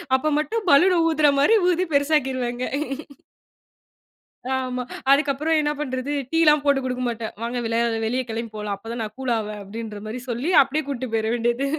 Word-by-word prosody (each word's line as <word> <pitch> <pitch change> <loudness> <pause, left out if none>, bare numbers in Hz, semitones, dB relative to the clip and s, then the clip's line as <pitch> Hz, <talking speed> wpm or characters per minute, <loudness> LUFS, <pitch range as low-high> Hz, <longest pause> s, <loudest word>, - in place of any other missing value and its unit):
அப்ப 265 +4 0
மட்டும் 435 +7 -2
பலூன் 360 +6 +6
ஊதற 310 -2 +3
மாரி 440 +11 +5
ஊதி 360 +1 +1
பெருசாக்கிருவேங்க. 260 -4 0 1.9
ஆமா, 255 -1 -3 0.3
அதுக்கப்றம் 300 +2 +2
என்ன 295 0 0
பண்றது, 260 -1 -3 0.2
டீலாம் 305 -3 +4
போட்டுக் 275 -2 +2
குடுக்க 255 0 -2
மாட்டேன். 230 -1 -4
வாங்க 240 +1 -2
வெளியே 230 +1 +1 0.2
வெளிய 255 +3 0
கெளம்பிப் 225 -1 -5
போலாம். 210 -1 -3
அப்பதான் 230 +1 -6
நான் 215 0 -8
கூல் 255 -2 -1
ஆவேன், 210 -1 -5
அப்டின்ற 215 0 -7
மாரி 235 +3 -5
சொல்லி 250 +9 -2
அப்டியே 290 +3 -2
கூட்டு 255 -3 -4
போயிடவேண்டியது. 235 +4 0
255 Hz, 155 wpm, -23 LUFS, 230-295 Hz, 1.9 s, பலூன்